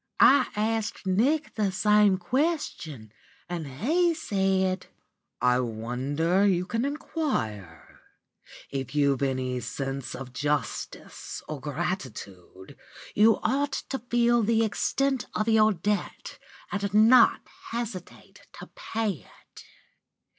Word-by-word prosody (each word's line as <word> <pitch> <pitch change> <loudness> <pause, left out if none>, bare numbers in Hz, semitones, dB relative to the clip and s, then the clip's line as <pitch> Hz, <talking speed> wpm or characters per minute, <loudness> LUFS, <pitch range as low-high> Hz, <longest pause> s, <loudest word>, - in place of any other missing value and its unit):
"I 275 -3 +6
asked 220 0 -2
Nick 260 +12 +1
the 210 -3 0
same 210 0 +4
question, 180 - -2 0.4
and 170 -4 -4
he 320 - +1
said: 190 - 0 0.5
"'I 125 0 +3
wonder 130 - -1
you 180 -2 +1
can 230 +5 -1
inquire. 115 - -4 0.7
If 135 0 -4
you've 140 -3 +2
got 140 - +1
any 130 -1 -2
sense 135 +1 -5
of 130 -2 -8
justice 145 -5 -4
or 155 -2 -5
gratitude, 130 - -6 0.4
you 220 +2 +5
ought 280 +2 0 0.2
to 270 - -2
feel 240 0 +2
the 225 +1 +2
extent 265 +4 0
of 215 - 0
your 220 -1 +5
debt 205 +3 -3 0.3
and 200 -1 -2
not 230 +3 +6 0.3
hesitate 230 -6 -7
to - - -11
pay 225 - -2 0.2
it. - - -17
195 Hz, 110 wpm, -27 LUFS, 135-230 Hz, 0.7 s, I